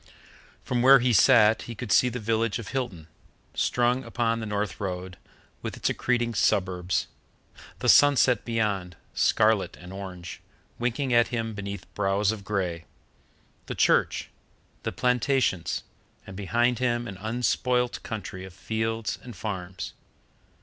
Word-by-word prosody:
From 125 -1 -1
where 135 +2 +8
he 125 -1 +2
sat 115 -2 +6
he 115 - -5
could 115 0 -6
see 125 - +5
the 125 - -5
village 115 -1 0
of 115 -4 -7
Hilton, 120 -12 -4 0.5
strung 125 +1 +1
upon 115 -1 -1
the 110 - -5
North 105 -1 -2
Road, 90 -2 -4 0.5
with - - -5
its - - 0
accreting 120 -2 0
suburbs; 90 -2 +1 0.7
the - - -3
sunset 135 -5 +5
beyond, 105 -6 -1 0.2
scarlet 110 -2 +2
and 90 +1 -10
orange, 95 -3 -8 0.4
winking 125 +2 -1
at 120 0 +5
him 115 -2 -3
beneath 100 -2 -6
brows 100 +1 +1
of 110 -2 -6
grey; 90 -5 -2 0.8
the - - -4
church; - - +2 0.5
the - - -3
plantations; 125 -6 0 0.4
and 95 - -10
behind 120 +5 +1
him 120 -1 0
an 100 - -7
unspoilt 125 +3 0
country 105 -4 -6
of 95 -1 -10
fields 110 +3 -3
and 120 -3 -10
farms. 95 -4 -5
110 Hz, 135 wpm, -26 LUFS, 95-120 Hz, 0.8 s, where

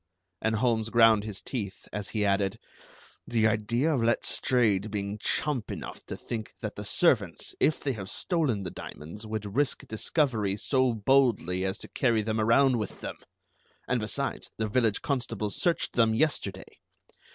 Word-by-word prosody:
And 110 0 +1
Holmes 115 -1 +1
ground 115 -3 +5
his 105 -3 -6
teeth 100 -7 -5
as 105 -1 -3
he 105 -2 0
added: 100 -1 +1 0.7
"The 115 -2 +2
idea 115 +7 +2
of 130 - +1
Letstrayed 115 -2 +1
being 100 0 -3
chump 135 0 -1
enough - - -7
to - - -5
think 110 -2 -6
that 110 - -3
the 105 - -7
servants, 105 - +1
if 155 - +3
they 140 - -1
have 95 -4 -6
stolen 145 - 0
the 90 - -4
diamonds, 105 +9 -9
would 105 -1 -4
risk 145 -2 0
discovery 110 -4 0
so 130 +1 +2
boldly 110 -6 +2
as 95 +1 -1
to - - -9
carry 115 -4 +1
them 110 +1 -1
around 120 +3 +4
with 105 - -5
them! - - -5 0.7
and 125 - +1
besides, 135 +6 -2
the 110 - 0
village 110 -1 +1
constables 115 -6 -1
searched 170 -1 +1
them 115 -2 +3
yesterday. 155 +6 -1
110 Hz, 160 wpm, -28 LUFS, 105-125 Hz, 0.7 s, ground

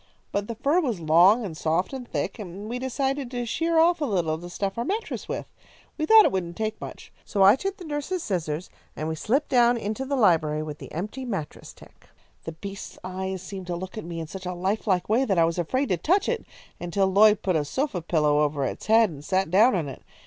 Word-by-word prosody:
But 205 0 -2
the 230 - -4
fur 280 +9 +2
was 245 - -1
long 175 +8 +5
and 170 -5 -6
soft 165 - 0
and 255 -2 -6
thick, - - -3
and 200 +1 -7
we 245 +2 -3
decided 265 +1 -2
to 245 -1 -3
shear 330 +8 0
off 335 +1 +4
a - - +2
little 175 - 0
to 175 +1 -9
stuff 195 +4 -3
our - - 0
mattress 425 - -3
with. - - -3 0.5
We 310 -1 -2
thought 440 +2 +8
it - - +3
wouldn't 175 -3 -3
take 220 0 -3
much. - - -9
So 200 -3 +1
I 200 +3 +8
took 390 +7 -4
the 360 - -10
nurse's 310 +4 -3
scissors, 165 -3 -3 0.2
and 155 - -4
we 160 - -1
slipped 240 - 0
down 240 -1 +4
into 220 +3 -3
the 275 +1 -2
library 160 - +3
with 150 -1 -7
the - - -10
empty 210 - -5
mattress 195 -12 -5
tick. - - -19 0.4
"The 165 - -5
beast's 195 +4 -8
eyes 190 0 -4
seemed 190 -1 -7
to 175 - -2
look 185 +2 -7
at 215 - -5
me 170 0 -6
in 165 - -4
such 185 +3 -8
a 180 - -3
life 195 +5 -2
like 185 -3 +1
way 230 +5 +3
that 200 -8 0
I 165 - +5
was 165 +1 -1
afraid 260 - 0
to 185 - +2
touch 370 - +2
it 475 -1 -2 0.3
until 175 +3 0
Lloyd 205 +2 +5
put 185 -3 +1
a 155 - +2
sofa 230 - -2
pillow 150 -3 +2
over 145 -2 +1
its - - -5
head 220 -2 +5
and 145 -2 -10
sat 185 +1 0
down 215 +6 +5
on 165 -5 -1
it. 135 - -8
195 Hz, 240 wpm, -25 LUFS, 170-250 Hz, 0.5 s, thought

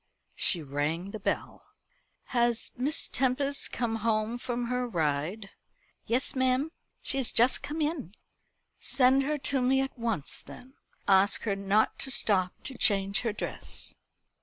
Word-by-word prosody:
She 170 -4 +2
rang 150 +7 -2
the 215 - -6
bell. 195 - -3 0.7
"Has 240 -1 +1
Miss 285 +6 +1
Tempest 275 +2 0
come 230 -2 -1
home 220 +1 0
from 240 0 -3
her 250 +1 -1
ride?" 170 +3 -2 0.6
"Yes, 245 +4 +1
ma'am. 260 +4 +1 0.3
She 270 - +1
has 250 - 0
just 245 +3 +3
come 310 +2 -4
in." 295 - -3 0.6
"Send 260 0 +4
her 300 +2 -1
to 270 -1 0
me 260 +2 +3
at 270 0 -2
once 225 -11 -2
then. 260 +2 -13 0.3
Ask 195 +1 +4
her 205 -3 0
not 200 +2 +1
to 270 - +2
stop 190 -7 +4
to 265 -3 -7
change 195 -1 +2
her 230 - -1
dress." 210 - -4
235 Hz, 145 wpm, -29 LUFS, 195-260 Hz, 0.7 s, Send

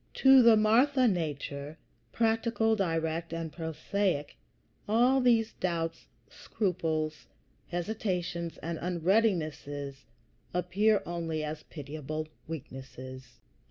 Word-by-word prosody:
To 265 -1 +7
the 230 -2 +7
Martha 250 +5 +4
nature, 150 -5 -3 0.3
practical, 225 -1 +2
direct, 165 -3 -1
and 165 -2 -4
prosaic, 160 0 -2 0.5
all 250 +5 +4
these 230 -3 +3
doubts, 165 -2 -3 0.2
scruples, 160 -6 -2 0.4
hesitations, 175 -2 -3
and 165 0 -3
unreadinesses 160 -7 0 0.5
appear 195 +4 +2
only 165 -2 -3
as 150 0 -4
pitiable 155 +1 -6 0.2
weaknesses. 130 -3 -9
170 Hz, 90 wpm, -30 LUFS, 155-215 Hz, 0.5 s, To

